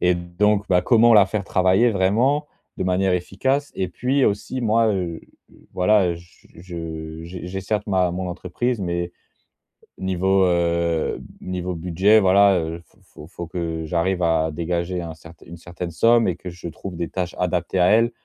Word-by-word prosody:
et 90 0 +3
donc, 100 +4 0
bah, 90 -1 +3
comment 115 +3 +5
la 100 -2 +8
faire 100 0 -3
travailler 95 +6 +3
vraiment 115 +10 +1 0.3
de - - -2
manière 95 0 +1
efficace? 130 +11 -1
Et 95 - -2
puis 130 +9 0
aussi 105 +5 -2
moi, 115 -1 +2
heu 90 -5 -2 0.3
heu, - - -21 0.2
voilà, 95 0 +3
heu, 85 - -2
j 85 +1 -18
je 80 -2 -7
j'ai 90 0 -8
j'ai 95 +1 -4
certes 105 +2 -2
ma 95 -3 +1
mon 90 +1 -4
entreprise, 100 +6 -3
mais 85 -1 -3 0.9
niveau 95 +1 +1
heu, 85 -2 0 0.2
niveau 90 -1 -4
budget, 90 +6 +3
voilà, 100 -1 +5
heu, 80 +1 -4
faut - - -30
faut 75 - -13
faut 85 -1 -7
que 80 -2 -4
j'arrive 90 +3 -1
à 80 -1 +1
dégager 85 +3 -2
un 80 -1 -7
certain 80 0 -16
une 85 +1 -10
certaine 85 0 -7
somme 115 +5 +4
et 90 - 0
que 90 +1 -8
je 85 0 -10
trouve 85 +2 -7
des 85 - -3
tâches 90 -2 -4
adaptées 90 +1 -1
à 90 - +4
elle. 115 +2 +4
90 Hz, 180 wpm, -22 LUFS, 85-100 Hz, 0.9 s, la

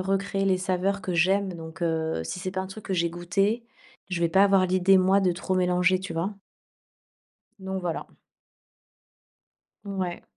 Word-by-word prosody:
recréer 195 +1 -1
les 190 -1 +2
saveurs 190 +2 0
que 185 -2 -3
j'aime, 190 +2 +2
donc 165 +1 -9
heu, 160 - -1
si 180 - -5
c'est 185 - -3
pas 190 0 -3
un 190 - -4
truc 195 +3 -10
que 190 - -3
j'ai 170 -1 +1
goûté, 195 +7 -1 0.5
je 175 -1 -2
vais 170 - +3
pas 190 +3 +5
avoir 195 -2 +4
l'idée, 185 +1 +4
moi, 190 +2 +4
de 185 -2 +2
trop 185 +2 -3
mélanger, 180 0 +2
tu 185 -2 -6
vois? 180 +6 -2 1.2
Donc 190 0 -4
voilà. 170 -2 -3 1.8
Ouais. 190 -3 -4
185 Hz, 170 wpm, -26 LUFS, 175-195 Hz, 1.8 s, pas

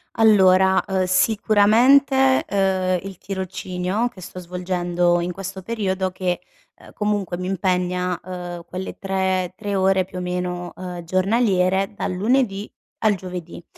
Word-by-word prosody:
Allora, 190 -3 +5
uhm, 190 -1 +1
sicuramente, 230 +8 +4
uhm, 190 -2 +1
il 190 - -10
tirocinio 190 +3 -3
che 190 - -15
sto 185 +1 -8
svolgendo 175 -1 0
in 175 +1 -2
questo 190 +1 -7
periodo 190 -3 -2
che, 180 -1 -2 0.4
uhm, - - -15
comunque 205 -4 -1
mi 180 - -4
impegna, 180 -1 -1
uhm, 175 -2 -7
quelle 185 +1 -6
3, 190 -2 -1
3 205 -2 -3
ore, 190 0 +3
più 185 0 -9
o - - -3
meno, 180 0 -3
uhm, 180 -2 -7
giornaliere 190 0 +1
dal 190 - -3
lunedì 210 0 0 0.3
al 215 -2 +4
giovedì. 180 -2 -8
185 Hz, 135 wpm, -22 LUFS, 180-200 Hz, 0.4 s, Allora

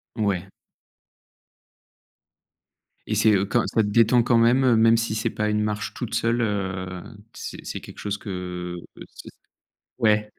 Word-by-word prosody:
Ouais. 100 -4 -1 2.6
Et - - -1
c'est, 110 - +4
heu, 100 0 +2
quand 120 +3 +1
ça 110 - +1
te 105 - 0
détend 115 +3 +4
quand 120 0 +3
même, 120 +3 +4
heu, 125 -3 +4
même 115 +1 +5
si 115 -1 -1
c'est 110 +1 0
pas 105 0 -2
une 105 0 +1
marche 105 0 -3
toute 120 -3 -6
seule, 115 +1 +1
heu, 95 -4 -3 0.3
c'est - - -8
c'est - - -5
quelque - - -12
chose 105 0 -3
que, 90 -3 -5 0.2
heu, - - -9
c - - -10 0.7
ouais. 105 -2 +2
105 Hz, 160 wpm, -24 LUFS, 100-115 Hz, 2.6 s, même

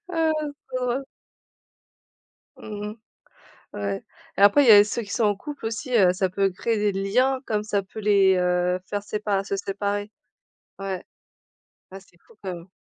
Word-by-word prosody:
Ah 325 -2 +1
c'est 285 -3 -5
trop 250 - -2
drôle. 255 +3 -1 1.5
Mmh 210 -1 -6
mh, 215 - -10 0.8
ouais. 100 -1 -3 0.3
Et - - 0
après, 205 +8 +7
il 250 - +4
y - - +11
a 205 -1 +10
ceux 210 +3 -3
qui 205 - -10
sont 225 - +1
en 205 -1 +2
couple 285 +5 -8
aussi, 225 +4 -4
heu, 180 -3 +5
ça 185 0 0
peut 195 +2 +1
créer 220 +5 -1
des 210 0 +1
liens 250 +8 +1
comme 210 -1 -1
ça 205 -2 -1
peut 195 +3 -10
les, 200 -2 +4
heu, 180 0 +1
faire 205 0 -3
sépa 205 -1 -1
se 200 - -3
séparer. 200 +1 -3 0.7
Ouais. 195 -2 -4 0.9
Ah, 195 - -8
c'est 190 -2 -24
fou - - -22
quand 190 -2 -4
même. 170 0 -10
205 Hz, 185 wpm, -24 LUFS, 195-225 Hz, 1.5 s, y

